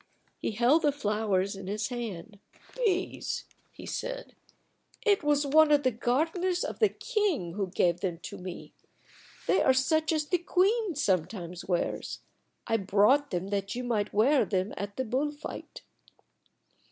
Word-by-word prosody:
He -, -, -2 dB
held 245 Hz, +9 st, +4 dB
the 295 Hz, -, +3 dB
flowers 210 Hz, -6 st, 0 dB
in 195 Hz, -1 st, -8 dB
his 210 Hz, +1 st, -2 dB
hand. 220 Hz, -4 st, -6 dB, 0.4 s
"These!" 395 Hz, -7 st, -1 dB, 0.3 s
he -, -, -11 dB
said. -, -, -5 dB, 0.7 s
"It 405 Hz, -6 st, +3 dB
was 295 Hz, 0 st, +2 dB
one 305 Hz, +2 st, +5 dB
of 290 Hz, -1 st, +4 dB
the 255 Hz, -, +3 dB
gardeners 325 Hz, -, 0 dB
of -, -, -5 dB
the 430 Hz, -, +5 dB
king 395 Hz, -, -1 dB
who 200 Hz, 0 st, -2 dB
gave 175 Hz, -1 st, +1 dB
them 175 Hz, -3 st, -2 dB
to -, -, -7 dB
me. 180 Hz, -1 st, -8 dB, 0.7 s
They -, -, +3 dB
are 265 Hz, -, +5 dB
such 310 Hz, +5 st, +2 dB
as 310 Hz, -2 st, +1 dB
the 360 Hz, +3 st, +1 dB
queen 385 Hz, +2 st, +1 dB
sometimes 180 Hz, -, -1 dB
wears. 175 Hz, -2 st, -2 dB, 0.4 s
I 225 Hz, -, +1 dB
brought 210 Hz, +9 st, +3 dB
them 185 Hz, +1 st, -3 dB
that 200 Hz, 0 st, -2 dB
you 250 Hz, -, -3 dB
might 215 Hz, -4 st, -1 dB
wear 260 Hz, +7 st, +4 dB
them 190 Hz, 0 st, -1 dB
at 200 Hz, +1 st, -6 dB
the 260 Hz, -, -1 dB
bull 265 Hz, +6 st, 0 dB
fight." 295 Hz, +1 st, -9 dB
245 Hz, 155 wpm, -29 LUFS, 200-315 Hz, 0.7 s, one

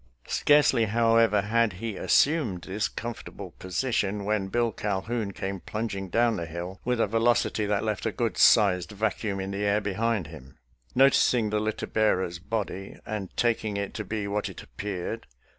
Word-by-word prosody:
Scarcely, 145 Hz, -5 st, +4 dB
however, 115 Hz, -1 st, +3 dB
had 110 Hz, 0 st, +1 dB
he 110 Hz, +3 st, -5 dB
as -, -, -4 dB
sumed 135 Hz, -, +3 dB
this 105 Hz, +3 st, -1 dB
comfortable 120 Hz, 0 st, -7 dB
position, 100 Hz, +1 st, -1 dB
when 105 Hz, -2 st, 0 dB
Bill 120 Hz, +3 st, +1 dB
Cal 100 Hz, -2 st, -2 dB
houn 110 Hz, -1 st, -3 dB
came 95 Hz, 0 st, -4 dB
plunging 100 Hz, -2 st, -4 dB
down 115 Hz, +3 st, +2 dB
the 85 Hz, -, -4 dB
hill 85 Hz, +3 st, -6 dB
with 125 Hz, -1 st, 0 dB
a -, -, +4 dB
ve 115 Hz, +2 st, 0 dB
locity 115 Hz, -2 st, +2 dB
that 105 Hz, 0 st, 0 dB
left 110 Hz, 0 st, -2 dB
a -, -, 0 dB
good 115 Hz, +1 st, -1 dB
sized 95 Hz, -4 st, +4 dB
vacuum 105 Hz, -1 st, -2 dB
in 95 Hz, +1 st, -4 dB
the 100 Hz, +1 st, -3 dB
air 105 Hz, +1 st, +2 dB
behind 105 Hz, -1 st, -1 dB
him. 70 Hz, -4 st, -12 dB, 0.4 s
Noticing 125 Hz, -4 st, +4 dB
the 105 Hz, -, +1 dB
litter 110 Hz, +1 st, -2 dB
bearer's 95 Hz, -5 st, 0 dB
body, 95 Hz, 0 st, -4 dB
and 105 Hz, -4 st, -4 dB
taking 110 Hz, -3 st, 0 dB
it 100 Hz, 0 st, -3 dB
to 110 Hz, -, -4 dB
be 105 Hz, 0 st, -3 dB
what 105 Hz, +1 st, -2 dB
it -, -, -9 dB
appeared. 100 Hz, -, -5 dB
105 Hz, 175 wpm, -27 LUFS, 95-115 Hz, 0.4 s, Scarcely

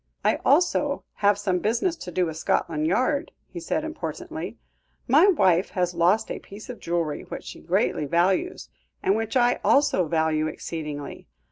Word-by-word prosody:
"I -, -, +3 dB
also 290 Hz, -2 st, +2 dB
have 205 Hz, -1 st, +3 dB
some 190 Hz, -3 st, 0 dB
business 235 Hz, -, 0 dB
to 180 Hz, -, -8 dB
do 180 Hz, +1 st, +1 dB
with 160 Hz, -2 st, -4 dB
Scotland 155 Hz, -1 st, 0 dB
Yard," 255 Hz, -, +1 dB, 0.2 s
he 175 Hz, -, -8 dB
said 170 Hz, -, -2 dB
importantly; 315 Hz, +1 st, -6 dB, 0.5 s
"my 300 Hz, +10 st, +6 dB
wife 190 Hz, -, +3 dB
has 180 Hz, -1 st, -1 dB
lost 180 Hz, +6 st, +2 dB
a -, -, -4 dB
piece 210 Hz, +5 st, -10 dB
of 245 Hz, -, -11 dB
jewellery 170 Hz, -3 st, -2 dB
which -, -, -7 dB
she -, -, -9 dB
greatly 150 Hz, -, 0 dB
values, 185 Hz, -, +1 dB, 0.4 s
and 195 Hz, -, +3 dB
which 225 Hz, +3 st, -1 dB
I 245 Hz, 0 st, +3 dB
also 275 Hz, -, +3 dB
value 160 Hz, -1 st, +1 dB
exceedingly. 150 Hz, -2 st, -6 dB
190 Hz, 160 wpm, -25 LUFS, 165-250 Hz, 0.5 s, my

